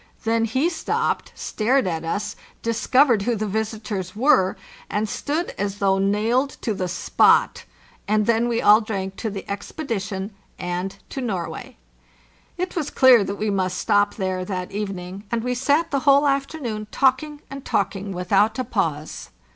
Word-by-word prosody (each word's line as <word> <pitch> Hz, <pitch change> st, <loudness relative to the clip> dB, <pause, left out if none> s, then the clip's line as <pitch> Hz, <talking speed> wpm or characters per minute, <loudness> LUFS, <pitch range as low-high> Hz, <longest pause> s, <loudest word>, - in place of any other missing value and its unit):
Then 225 Hz, 0 st, +2 dB
he 260 Hz, +8 st, +1 dB
stopped, 345 Hz, -2 st, -1 dB
stared 245 Hz, +3 st, +1 dB
at 165 Hz, -3 st, -2 dB
us, 185 Hz, +6 st, -3 dB, 0.3 s
discov 255 Hz, +5 st, +3 dB
ered 225 Hz, -4 st, +3 dB
who 235 Hz, +4 st, 0 dB
the 215 Hz, 0 st, -2 dB
visitors 210 Hz, -3 st, -3 dB
were, 235 Hz, -6 st, +3 dB, 0.3 s
and 210 Hz, +1 st, -1 dB
stood 305 Hz, -, -2 dB
as 200 Hz, 0 st, -2 dB
though 195 Hz, -1 st, +2 dB
nailed 220 Hz, +7 st, +1 dB
to 220 Hz, -, 0 dB
the 185 Hz, -2 st, -2 dB
spot; 180 Hz, -, +3 dB, 0.4 s
and 210 Hz, 0 st, +2 dB
then 235 Hz, +1 st, +2 dB
we 235 Hz, -1 st, 0 dB
all 210 Hz, +2 st, +7 dB
drank 195 Hz, -3 st, -4 dB
to 225 Hz, -, -3 dB
the 195 Hz, -1 st, -7 dB
expedition 200 Hz, -2 st, -4 dB, 0.3 s
and 180 Hz, +2 st, -4 dB
to 270 Hz, -, -5 dB
Norway. 230 Hz, +3 st, -4 dB, 0.8 s
It 365 Hz, +1 st, -3 dB
was 310 Hz, -5 st, -1 dB
clear 255 Hz, -5 st, +6 dB
that 200 Hz, +1 st, -3 dB
we 210 Hz, +1 st, -1 dB
must 185 Hz, -2 st, -1 dB
stop 205 Hz, -1 st, +2 dB
there 185 Hz, -2 st, -2 dB
that 185 Hz, -1 st, -4 dB
even 200 Hz, -1 st, -3 dB
ing, 180 Hz, +3 st, -8 dB
and 235 Hz, -1 st, -1 dB
we 250 Hz, 0 st, 0 dB
sat 285 Hz, +6 st, +1 dB
the 275 Hz, -, +1 dB
whole 280 Hz, +1 st, +5 dB
afternoon 275 Hz, -6 st, -2 dB
talking 280 Hz, +4 st, +1 dB
and 275 Hz, -1 st, -7 dB
talk -, -, 0 dB
ing 195 Hz, +1 st, -5 dB
without 190 Hz, +4 st, +2 dB
a 255 Hz, -, 0 dB
pause. 160 Hz, -, -3 dB
215 Hz, 170 wpm, -23 LUFS, 195-255 Hz, 0.8 s, all